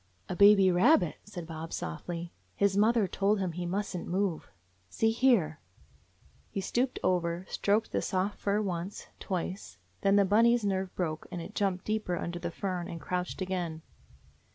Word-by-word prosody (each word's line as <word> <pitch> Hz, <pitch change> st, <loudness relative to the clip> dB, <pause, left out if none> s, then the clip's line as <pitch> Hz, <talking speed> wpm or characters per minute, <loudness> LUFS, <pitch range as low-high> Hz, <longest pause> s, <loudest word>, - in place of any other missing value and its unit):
"A -, -, -3 dB
baby 200 Hz, -1 st, +7 dB
rabbit," 180 Hz, -, +4 dB
said 180 Hz, -5 st, -7 dB
Bob 160 Hz, 0 st, -7 dB
softly. 170 Hz, -, -5 dB, 0.2 s
"His 200 Hz, -1 st, +2 dB
mother 215 Hz, 0 st, +4 dB
told 200 Hz, +3 st, +1 dB
him 185 Hz, -2 st, -1 dB
he 175 Hz, +1 st, -4 dB
must 195 Hz, +2 st, -2 dB
n't 175 Hz, -, -5 dB
move. 185 Hz, -2 st, -1 dB, 0.4 s
See 225 Hz, -, +2 dB
here 225 Hz, -, +3 dB, 0.5 s
!" -, -, -33 dB
He -, -, -4 dB
stooped 245 Hz, +6 st, 0 dB
over, 175 Hz, 0 st, 0 dB
stroked 210 Hz, +2 st, 0 dB
the -, -, 0 dB
soft 190 Hz, +2 st, -1 dB
fur, 205 Hz, +1 st, +1 dB
once, 180 Hz, 0 st, -4 dB
twice 185 Hz, -, -4 dB
— 90 Hz, -, -37 dB
then 195 Hz, 0 st, +4 dB
Bunny's 230 Hz, +2 st, +4 dB
nerve 190 Hz, -2 st, -1 dB
broke, 160 Hz, -4 st, -3 dB
and 175 Hz, -, -4 dB
it 165 Hz, -, -8 dB
jumped 190 Hz, -2 st, -1 dB
deeper 215 Hz, -5 st, -1 dB
under 175 Hz, 0 st, -4 dB
the 175 Hz, -, -3 dB
fern 180 Hz, 0 st, -3 dB
and 165 Hz, -, -6 dB
crouched 180 Hz, +2 st, -3 dB
again. 175 Hz, -4 st, -3 dB
185 Hz, 170 wpm, -30 LUFS, 175-205 Hz, 0.5 s, baby